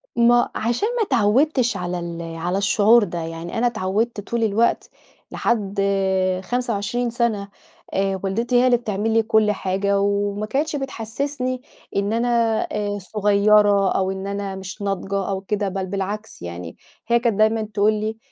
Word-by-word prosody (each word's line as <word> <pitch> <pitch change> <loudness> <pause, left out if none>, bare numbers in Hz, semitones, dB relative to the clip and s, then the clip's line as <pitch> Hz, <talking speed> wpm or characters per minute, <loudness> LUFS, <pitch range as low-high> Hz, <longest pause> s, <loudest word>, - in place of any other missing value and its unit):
ما 240 0 +4
عشان 240 - 0
ما - - +1
اتعوّدتش 245 - +2
على 180 0 -3
ال 170 -1 -5 0.2
على 175 +3 -1
الشعور 210 +3 +4
ده 175 -3 -4
يعني 165 +2 -5
أنا 240 +2 +3
اتعودت 215 0 -1
طول 235 +3 -2
الوقت 220 +2 +1 0.4
لحد 205 -4 -1 0.6
25 240 +1 -1
سنة 225 -4 -1 0.4
آآ، 195 0 0
والدتي 230 +6 -1
هي 245 +1 +5
اللي 250 -1 +4
بتعمل 220 -1 -2
لي 225 0 +4
كُلّ 220 -1 +3
حاجة 200 0 0
وما 205 +1 0
كانتش 290 +7 -1
بتحسسني 255 0 -3 0.3
إن 200 +2 0
أنا 235 +2 +1 0.4
آآ، 205 -1 -2
صغيرة 205 0 +3
أو 190 0 0
إن 190 0 -5
أنا 200 -1 -3
مش 190 +2 -8
ناضجة 195 0 -2
أو 190 -1 -2
كده 200 0 -1
بل 190 0 -3
بالعكس، 200 +3 -5
يعني 85 -1 -7 0.3
هي 235 0 +4
كانت 230 -4 0
دايمًا 220 +1 +3
تقول 215 0 +1
لي 215 +1 -3
210 Hz, 155 wpm, -22 LUFS, 195-235 Hz, 0.6 s, هي